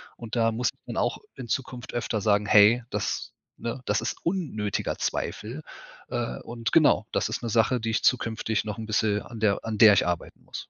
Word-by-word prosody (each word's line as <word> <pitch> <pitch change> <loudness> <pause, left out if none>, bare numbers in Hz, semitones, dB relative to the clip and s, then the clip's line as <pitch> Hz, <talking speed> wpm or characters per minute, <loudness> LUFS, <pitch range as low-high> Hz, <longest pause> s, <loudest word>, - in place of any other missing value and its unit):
und 115 -1 -7
da 115 -1 +3
muss 120 +2 0 0.2
man - - -6
auch - - 0 0.2
in 120 - -8
Zukunft 125 0 -4
öfter 115 -2 -1
sagen: 105 0 +2
„Hey, 105 +4 +6
das - - -3 0.2
ne, 120 +2 -5
das 105 +2 +1
ist 115 - -3
unnötiger 150 - -2
Zweifel“, 120 +9 -3 0.5
äh, 60 0 -3
und 115 -1 -4
genau, - - +4
das - - 0
ist - - -4
'ne 115 - -3
Sache, 115 +3 +2
die 115 - -2
ich 115 +2 0
zukünftig 110 -3 +1
noch 105 +1 -4
bisschen 110 -1 +1
an 115 -2 -10
der 105 -1 +1
an 110 -2 -3
der 110 -3 +9
ich 100 - +3
arbeiten 90 -1 -4
muss. - - -8
110 Hz, 195 wpm, -26 LUFS, 105-120 Hz, 0.5 s, der